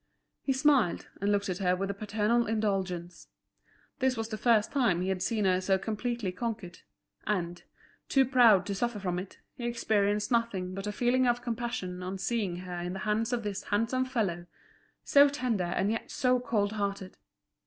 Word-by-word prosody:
He 275 Hz, -, -1 dB
smiled, 265 Hz, -, +2 dB
and 200 Hz, +1 st, +1 dB
looked 200 Hz, -1 st, +1 dB
at 185 Hz, 0 st, -3 dB
her 180 Hz, -2 st, +2 dB
with 195 Hz, +2 st, -2 dB
a -, -, -5 dB
paternal 215 Hz, +3 st, 0 dB
indulgence. 190 Hz, -5 st, -2 dB, 0.7 s
This 260 Hz, -2 st, +1 dB
was 225 Hz, 0 st, -3 dB
the 215 Hz, -, -3 dB
first 225 Hz, -3 st, +3 dB
time 235 Hz, -11 st, +2 dB
he 185 Hz, -, -1 dB
had 190 Hz, -1 st, -1 dB
seen 210 Hz, +1 st, 0 dB
her 185 Hz, -1 st, +3 dB
so 190 Hz, 0 st, +2 dB
completely 220 Hz, 0 st, -3 dB
conquered; 210 Hz, -3 st, -5 dB, 0.5 s
and, 175 Hz, -4 st, -1 dB, 0.5 s
too 270 Hz, -1 st, +4 dB
proud 235 Hz, -7 st, +5 dB
to 200 Hz, -, -2 dB
suffer 235 Hz, +3 st, -1 dB
from 180 Hz, -2 st, -2 dB
it, 185 Hz, +1 st, -9 dB, 0.2 s
he 245 Hz, -, -9 dB
experienced 210 Hz, -2 st, +1 dB
nothing 210 Hz, -6 st, 0 dB
but 195 Hz, +2 st, -5 dB
a -, -, -1 dB
feeling 245 Hz, +3 st, +2 dB
of 240 Hz, 0 st, +1 dB
compassion 230 Hz, -6 st, -3 dB
on 185 Hz, +1 st, -4 dB
seeing 200 Hz, -3 st, -1 dB
her 180 Hz, -1 st, -5 dB
in 175 Hz, +1 st, -4 dB
the 195 Hz, -, -5 dB
hands 220 Hz, +2 st, 0 dB
of 240 Hz, -2 st, -1 dB
this 205 Hz, -1 st, -4 dB
handsome 230 Hz, +5 st, 0 dB
fellow, 195 Hz, -9 st, -2 dB, 0.6 s
so 285 Hz, 0 st, +6 dB
tender 250 Hz, -9 st, -1 dB
and 190 Hz, +4 st, 0 dB
yet 225 Hz, -, -3 dB
so 255 Hz, -1 st, +2 dB
cold 210 Hz, -4 st, 0 dB
hearted. 200 Hz, -3 st, -3 dB
210 Hz, 185 wpm, -29 LUFS, 190-240 Hz, 0.7 s, so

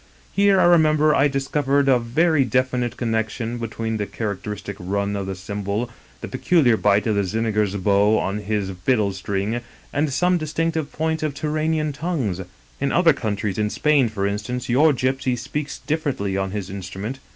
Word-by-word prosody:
Here, 200 Hz, -1 st, +4 dB
I -, -, +5 dB
remember, 155 Hz, -3 st, +5 dB
I 140 Hz, -, +4 dB
discovered 140 Hz, 0 st, +1 dB
a 130 Hz, -2 st, +5 dB
very 145 Hz, +6 st, +2 dB
definite 125 Hz, -1 st, 0 dB
connection 115 Hz, 0 st, -2 dB
between 115 Hz, -1 st, -3 dB
the 105 Hz, -1 st, -2 dB
characteristic 105 Hz, -1 st, -5 dB
run 100 Hz, +2 st, -2 dB
of 100 Hz, -1 st, -3 dB
the 95 Hz, -, -3 dB
tsimbol, 100 Hz, +4 st, -3 dB, 0.3 s
the -, -, -5 dB
peculiar 145 Hz, -10 st, +3 dB
bite 105 Hz, -1 st, +2 dB
of 110 Hz, -, +1 dB
the 100 Hz, -1 st, +1 dB
Zigeuner's 105 Hz, 0 st, 0 dB
bow 100 Hz, +2 st, +3 dB
on 100 Hz, +2 st, -1 dB
his 105 Hz, -2 st, -2 dB
fiddle 105 Hz, -7 st, +2 dB
string, 100 Hz, +4 st, -2 dB, 0.3 s
and 145 Hz, +1 st, +1 dB
some 180 Hz, +6 st, +2 dB
distinctive 160 Hz, 0 st, -2 dB
points 160 Hz, 0 st, -1 dB
of 155 Hz, -3 st, -2 dB
Turanian 155 Hz, 0 st, -1 dB
tongues. 140 Hz, -, -2 dB, 0.4 s
In 140 Hz, 0 st, 0 dB
other 170 Hz, -2 st, +5 dB
countries, 105 Hz, -5 st, -2 dB
in 105 Hz, 0 st, +1 dB
Spain, 145 Hz, -1 st, +2 dB
for 100 Hz, -2 st, -2 dB
instance, 105 Hz, +6 st, -3 dB
your 145 Hz, +6 st, +5 dB
gypsy 130 Hz, -1 st, 0 dB
speaks 145 Hz, +4 st, -4 dB
differently 145 Hz, -11 st, -2 dB
on 95 Hz, 0 st, -1 dB
his 100 Hz, -1 st, -5 dB
instrument. 100 Hz, +6 st, -6 dB
120 Hz, 165 wpm, -22 LUFS, 100-150 Hz, 0.4 s, I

